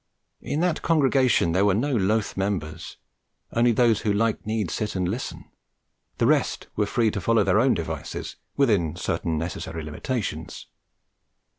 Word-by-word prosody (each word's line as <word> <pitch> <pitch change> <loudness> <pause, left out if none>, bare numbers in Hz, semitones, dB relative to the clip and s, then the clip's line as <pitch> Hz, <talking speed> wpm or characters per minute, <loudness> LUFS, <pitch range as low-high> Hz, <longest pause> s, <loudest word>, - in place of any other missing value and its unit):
In 150 - -2
that 175 -2 +1
congregation 135 - +3
there 95 +4 +2
were 100 -2 +3
no 135 +5 0
loath 105 +1 +1
members; 95 -6 -3 0.6
only 120 +1 +4
those 115 -2 +3
who 105 - +1
liked 110 +1 0
need 110 -4 -1
sit 105 -2 -3
and 90 -1 0
listen; 115 +8 -4 0.7
the - - +2
rest - - +1
were 105 -1 +1
free 115 0 +1
to 100 - -3
follow 115 +3 +3
their - - +3
own - - +4
devices, - - -5 0.2
within 105 - +2
certain 80 -2 -2
necessary 85 +1 -4
limitations. 80 - -4
105 Hz, 150 wpm, -25 LUFS, 90-120 Hz, 0.7 s, only